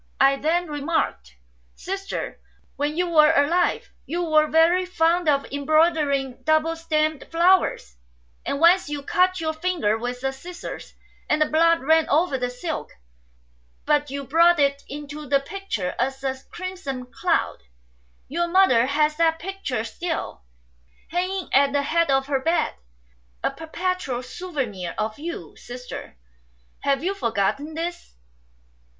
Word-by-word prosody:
I 275 Hz, 0 st, +5 dB
then 340 Hz, +5 st, 0 dB
remarked, 290 Hz, -, -2 dB, 0.2 s
' -, -, -38 dB
Sister, 390 Hz, +1 st, -4 dB, 0.4 s
when 295 Hz, +2 st, -2 dB
you 360 Hz, 0 st, +1 dB
were 310 Hz, -2 st, +6 dB
alive 330 Hz, +5 st, +1 dB, 0.2 s
you 345 Hz, +3 st, -2 dB
were 310 Hz, -2 st, +3 dB
very 330 Hz, +4 st, +4 dB
fond 350 Hz, -2 st, +1 dB
of 280 Hz, -1 st, +2 dB
embroidering 285 Hz, -3 st, +1 dB
double 315 Hz, +3 st, +2 dB
stemmed 310 Hz, -2 st, -1 dB
flowers; 340 Hz, -, +2 dB, 0.5 s
and 280 Hz, -, -2 dB
once 345 Hz, +1 st, +5 dB
you 290 Hz, -1 st, -4 dB
cut 365 Hz, +4 st, +2 dB
your 315 Hz, -1 st, -1 dB
finger 315 Hz, -10 st, 0 dB
with 245 Hz, +1 st, -4 dB
the 270 Hz, 0 st, -1 dB
scissors, 345 Hz, +6 st, -9 dB, 0.3 s
and 300 Hz, -, +2 dB
the 305 Hz, -, +4 dB
blood 330 Hz, +2 st, +3 dB
ran 320 Hz, +3 st, +3 dB
over 315 Hz, 0 st, +2 dB
the 250 Hz, 0 st, -1 dB
silk, 310 Hz, +6 st, -5 dB, 1.0 s
but 295 Hz, -1 st, +2 dB
you 280 Hz, +1 st, -4 dB
brought 335 Hz, +5 st, +4 dB
it 280 Hz, 0 st, +2 dB
into 295 Hz, +1 st, -7 dB
the 275 Hz, +1 st, +3 dB
picture 275 Hz, -, -4 dB
as 270 Hz, +1 st, -1 dB
a 265 Hz, -1 st, -1 dB
crimson 350 Hz, -9 st, -5 dB
cloud. 335 Hz, +8 st, -1 dB, 0.7 s
Your 345 Hz, +5 st, -1 dB
mother 340 Hz, -10 st, +4 dB
has 300 Hz, +2 st, +1 dB
that 325 Hz, -1 st, +3 dB
picture 340 Hz, -, -4 dB
still, 325 Hz, -, -4 dB, 0.7 s
hanging 370 Hz, +1 st, -1 dB
at 275 Hz, +1 st, +4 dB
the 285 Hz, 0 st, +2 dB
head 335 Hz, +3 st, +1 dB
of 270 Hz, 0 st, +2 dB
her 275 Hz, -1 st, 0 dB
bed, 330 Hz, +5 st, +1 dB, 0.7 s
a -, -, +1 dB
perpetual 325 Hz, -6 st, -3 dB
souvenir 255 Hz, -, -5 dB
of 215 Hz, +4 st, -3 dB
you. 335 Hz, +3 st, -6 dB
Sister, 250 Hz, -, -9 dB, 0.6 s
have 275 Hz, +1 st, 0 dB
you 380 Hz, +3 st, 0 dB
forgotten 275 Hz, -, -1 dB
this 335 Hz, -, -5 dB
305 Hz, 140 wpm, -24 LUFS, 270-340 Hz, 1.0 s, were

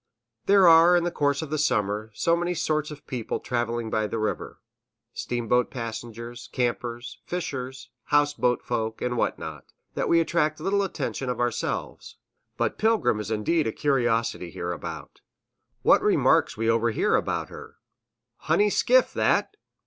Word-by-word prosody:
There 195 Hz, -2 st, +6 dB
are, 170 Hz, +2 st, +7 dB
in 175 Hz, -, +1 dB
the 175 Hz, -, -1 dB
course 145 Hz, -1 st, 0 dB
of 155 Hz, -, -8 dB
the 155 Hz, -, -1 dB
summer, 105 Hz, -6 st, 0 dB
so 170 Hz, +8 st, +2 dB
many 175 Hz, +1 st, -1 dB
sorts 155 Hz, -2 st, -1 dB
of 150 Hz, -1 st, -10 dB
people 125 Hz, -5 st, -4 dB
traveling 120 Hz, -2 st, -2 dB
by 110 Hz, -1 st, 0 dB
the 115 Hz, -, -4 dB
river, 110 Hz, -1 st, -3 dB, 0.5 s
steamboat 120 Hz, 0 st, 0 dB
passengers, 115 Hz, 0 st, -7 dB
campers, 120 Hz, -1 st, -3 dB
fishers, 130 Hz, -7 st, -5 dB
house 145 Hz, 0 st, +3 dB
boat 125 Hz, -3 st, 0 dB
folk, 110 Hz, -2 st, -3 dB
and 125 Hz, 0 st, -2 dB
what -, -, 0 dB
not, -, -, -8 dB, 0.3 s
that -, -, -2 dB
we 170 Hz, -, +5 dB
attract 155 Hz, -2 st, 0 dB
little 200 Hz, +5 st, +1 dB
attention 155 Hz, -8 st, -3 dB
of 125 Hz, -, -3 dB
ourselves, 120 Hz, -1 st, -3 dB, 0.4 s
but -, -, -1 dB
Pilgrim 220 Hz, -, +2 dB
is 105 Hz, -1 st, -5 dB
indeed 115 Hz, +9 st, 0 dB
a -, -, 0 dB
curiosity 120 Hz, -9 st, 0 dB
hereabout. 85 Hz, -2 st, -6 dB, 0.6 s
What -, -, +5 dB
remarks -, -, +3 dB
we 115 Hz, +1 st, -1 dB
overhear 115 Hz, 0 st, +1 dB
are -, -, +5 dB
about -, -, -2 dB
her, -, -, -11 dB, 0.6 s
"Honey 210 Hz, 0 st, +2 dB
skiff, -, -, +3 dB
that!" -, -, +1 dB
125 Hz, 155 wpm, -25 LUFS, 115-160 Hz, 0.6 s, are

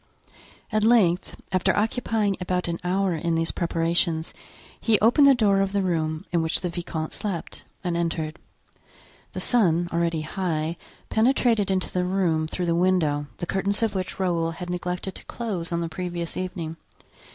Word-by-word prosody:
At 215 Hz, -1 st, +2 dB
length, 210 Hz, -7 st, +3 dB
after 185 Hz, -2 st, +2 dB
occupying 220 Hz, -2 st, +1 dB
about 180 Hz, 0 st, -1 dB
an 170 Hz, 0 st, -2 dB
hour 185 Hz, +1 st, +1 dB
in 165 Hz, +1 st, -1 dB
these 165 Hz, 0 st, 0 dB
preparations, 165 Hz, -1 st, +1 dB, 0.5 s
he 225 Hz, -2 st, +3 dB
opened 245 Hz, +7 st, +6 dB
the 275 Hz, -, +7 dB
door 200 Hz, -4 st, +3 dB
of 195 Hz, 0 st, 0 dB
the 200 Hz, -1 st, +1 dB
room 160 Hz, -3 st, -1 dB
in 170 Hz, -2 st, +2 dB
which 160 Hz, 0 st, 0 dB
the 180 Hz, -, -1 dB
vicomte 170 Hz, -2 st, -4 dB
slept, 195 Hz, -6 st, -4 dB, 0.2 s
and 175 Hz, -2 st, -1 dB
entered. 165 Hz, -1 st, -2 dB, 0.9 s
The -, -, -4 dB
sun, 175 Hz, -8 st, +3 dB
already 170 Hz, -1 st, +1 dB
high, 165 Hz, -1 st, -2 dB, 0.3 s
penetrated 225 Hz, -3 st, +3 dB
into 190 Hz, -1 st, 0 dB
the 180 Hz, -, 0 dB
room 180 Hz, -4 st, +1 dB
through 180 Hz, +3 st, -3 dB
the 170 Hz, -, +1 dB
window, 165 Hz, -5 st, +2 dB
the -, -, -3 dB
curtains 200 Hz, +4 st, 0 dB
of 225 Hz, -, +1 dB
which 185 Hz, -1 st, -4 dB
Raoul 170 Hz, -3 st, +1 dB
had 175 Hz, +2 st, -6 dB
neglected 180 Hz, +1 st, -3 dB
to -, -, -10 dB
close 190 Hz, -8 st, -4 dB
on 170 Hz, 0 st, 0 dB
the 170 Hz, -, -1 dB
previous 175 Hz, 0 st, -4 dB
evening. 175 Hz, -3 st, -4 dB
180 Hz, 165 wpm, -25 LUFS, 165-195 Hz, 0.9 s, the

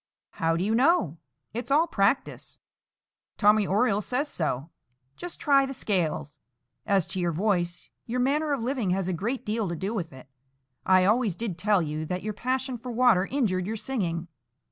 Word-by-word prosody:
"How 165 Hz, 0 st, 0 dB
do 175 Hz, -, 0 dB
you 215 Hz, +3 st, +1 dB
know? 230 Hz, -, +3 dB, 0.3 s
It's 240 Hz, +2 st, -4 dB
all 300 Hz, +4 st, +4 dB
practice; 220 Hz, -4 st, -1 dB, 0.8 s
Tommy 210 Hz, -1 st, +4 dB
Oriole 210 Hz, +1 st, +2 dB
says 255 Hz, +7 st, -1 dB
so. 155 Hz, -1 st, -2 dB, 0.4 s
Just 355 Hz, -, -7 dB
try 275 Hz, -2 st, +4 dB
the 270 Hz, -, -5 dB
scales. 160 Hz, -, -1 dB, 0.5 s
As 195 Hz, -4 st, +3 dB
to 190 Hz, -, -5 dB
your 175 Hz, -1 st, +1 dB
voice, 175 Hz, -1 st, -1 dB, 0.2 s
your 245 Hz, +2 st, -2 dB
manner 290 Hz, +4 st, +1 dB
of 275 Hz, -5 st, -1 dB
living 245 Hz, -5 st, -1 dB
has 185 Hz, 0 st, 0 dB
a 185 Hz, -, 0 dB
great 230 Hz, +10 st, -3 dB
deal 215 Hz, -2 st, -1 dB
to 170 Hz, -, -3 dB
do 195 Hz, +7 st, -3 dB
with 175 Hz, -7 st, -3 dB
it. 130 Hz, -1 st, -13 dB, 0.6 s
I 185 Hz, -1 st, +5 dB
always 215 Hz, -2 st, +2 dB
did 215 Hz, -3 st, -3 dB
tell 205 Hz, -1 st, +2 dB
you 155 Hz, 0 st, -4 dB
that 180 Hz, +2 st, -3 dB
your 215 Hz, 0 st, -3 dB
passion 255 Hz, +3 st, -2 dB
for 250 Hz, +1 st, -6 dB
water 230 Hz, -6 st, +4 dB
injured 195 Hz, -10 st, 0 dB
your 225 Hz, +1 st, -3 dB
singing. 175 Hz, -9 st, -2 dB
205 Hz, 180 wpm, -27 LUFS, 175-250 Hz, 0.8 s, I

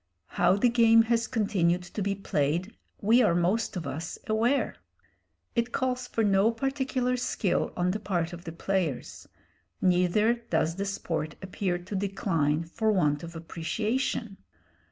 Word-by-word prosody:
How 185 Hz, -, +3 dB
the 205 Hz, +5 st, +3 dB
game 230 Hz, -1 st, +6 dB
has 230 Hz, 0 st, +1 dB
continued 190 Hz, -7 st, +1 dB
to 180 Hz, +4 st, -6 dB
be 200 Hz, 0 st, 0 dB
played 175 Hz, +1 st, -1 dB, 0.3 s
we 230 Hz, +5 st, +5 dB
are 170 Hz, -, +3 dB
most 190 Hz, +4 st, +1 dB
of 170 Hz, -, -4 dB
us 165 Hz, +4 st, -5 dB
aware. 230 Hz, +6 st, +1 dB, 0.8 s
It 235 Hz, 0 st, 0 dB
calls 255 Hz, -1 st, -1 dB
for 225 Hz, -, -1 dB
no 200 Hz, +1 st, +4 dB
particular 260 Hz, 0 st, -1 dB
skill 235 Hz, -5 st, 0 dB
on 180 Hz, 0 st, +1 dB
the 210 Hz, -, -2 dB
part 175 Hz, -4 st, -2 dB
of 175 Hz, 0 st, -8 dB
the 165 Hz, -, -5 dB
players, 170 Hz, -5 st, -2 dB, 0.5 s
neither 180 Hz, +5 st, +3 dB, 0.2 s
does 165 Hz, +1 st, +1 dB
the 200 Hz, -, -1 dB
sport 165 Hz, -5 st, -3 dB
appear 185 Hz, -1 st, -2 dB
to 180 Hz, +3 st, -7 dB
decline 170 Hz, -6 st, 0 dB
for 215 Hz, +7 st, 0 dB
want 150 Hz, -7 st, +2 dB
of 170 Hz, 0 st, -9 dB
appreciation. 210 Hz, +7 st, -2 dB
195 Hz, 150 wpm, -28 LUFS, 170-225 Hz, 0.8 s, game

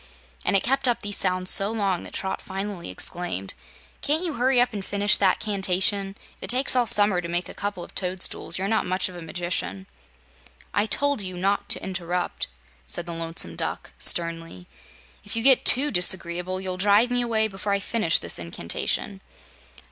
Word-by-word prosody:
And -, -, +1 dB
it 195 Hz, -, +3 dB
kept 270 Hz, +2 st, 0 dB
up 240 Hz, -, 0 dB
these 205 Hz, 0 st, -1 dB
sounds 185 Hz, -1 st, +2 dB
so 195 Hz, +1 st, +4 dB
long 200 Hz, -5 st, -1 dB
that -, -, -11 dB
Trot 190 Hz, 0 st, -3 dB
finally 195 Hz, -, -6 dB
exclaimed: 95 Hz, -, -3 dB, 0.5 s
"Can't 310 Hz, +4 st, 0 dB
you 340 Hz, -4 st, -2 dB
hurry 255 Hz, 0 st, +2 dB
up 245 Hz, -1 st, +2 dB
and 200 Hz, -2 st, -5 dB
finish 205 Hz, +2 st, +2 dB
that 190 Hz, -2 st, +2 dB
'cantation? 195 Hz, 0 st, -1 dB, 0.2 s
If -, -, -32 dB
it -, -, -9 dB
takes 255 Hz, +1 st, +2 dB
all 245 Hz, -2 st, +2 dB
summer 205 Hz, -5 st, +4 dB
to 170 Hz, -, -6 dB
make 175 Hz, +1 st, -2 dB
a -, -, -8 dB
couple 200 Hz, -3 st, -5 dB
of -, -, -13 dB
toadstools, 185 Hz, 0 st, 0 dB
you're 190 Hz, +1 st, -2 dB
not 220 Hz, +1 st, 0 dB
much 185 Hz, +1 st, -1 dB
of 180 Hz, -, -11 dB
a 175 Hz, -, -8 dB
magician." 180 Hz, +3 st, -3 dB, 0.9 s
"I 205 Hz, +2 st, +1 dB
told 285 Hz, 0 st, +1 dB
you 185 Hz, -2 st, -6 dB
not 195 Hz, +3 st, -1 dB
to -, -, +2 dB
interrupt," 180 Hz, -1 st, -3 dB, 0.4 s
said 170 Hz, -, -4 dB
the 170 Hz, -, -6 dB
Lonesome 165 Hz, -, -1 dB
Duck, -, -, -5 dB
sternly. 165 Hz, -, +3 dB, 0.6 s
"If 205 Hz, -, -3 dB
you 225 Hz, -, -1 dB
get 265 Hz, -1 st, +5 dB
TOO 285 Hz, +3 st, +6 dB
disagreeable, 180 Hz, -1 st, 0 dB
you'll 185 Hz, -1 st, -4 dB
drive 205 Hz, +5 st, +3 dB
me 245 Hz, 0 st, +1 dB
away 225 Hz, -2 st, +1 dB
before 200 Hz, 0 st, -5 dB
I 200 Hz, -, +1 dB
finish 200 Hz, -4 st, +2 dB
this -, -, -1 dB
incantation." 85 Hz, 0 st, -3 dB
195 Hz, 185 wpm, -24 LUFS, 180-220 Hz, 0.9 s, TOO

